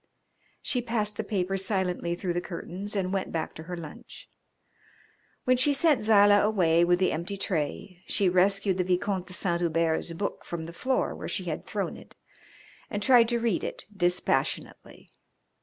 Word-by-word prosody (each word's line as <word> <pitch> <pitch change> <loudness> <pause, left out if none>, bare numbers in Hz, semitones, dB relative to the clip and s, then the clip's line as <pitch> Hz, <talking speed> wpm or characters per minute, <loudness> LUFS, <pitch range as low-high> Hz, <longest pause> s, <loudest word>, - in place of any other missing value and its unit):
She 250 - 0
passed 220 -3 -1
the 220 - -3
paper 195 -2 -1
silently 185 -3 -1
through 175 0 -2
the 175 - -1
curtains 190 +4 -6
and 190 -1 -1
went 195 -1 -2
back 160 -1 -3
to 160 - -9
her 180 - -4
lunch. 160 -3 -11 1.1
When 255 0 +3
she 285 +3 +3
sent 290 -3 +3
Zilah 205 -1 +6
away 175 -6 +3
with 175 0 +4
the 185 - +2
empty 170 +5 -3
tray 180 0 -3
she 200 - +1
rescued 190 +1 +2
the 180 - +2
Vicomte 185 +1 -1
de 185 - -10
Saint 175 -2 -1
Hubert's 165 0 +1
book 200 +4 -4
from 165 -2 -5
the 170 - -9
floor 260 +8 0
where - - -7
she - - -3
had - - -4
thrown - - -3
it - - -15 0.7
and 205 0 -3
tried 240 -3 +6
to 240 - +1
read 230 -5 0
it - - -5
dispassionately. 180 -1 -1
190 Hz, 175 wpm, -27 LUFS, 175-210 Hz, 1.1 s, Zilah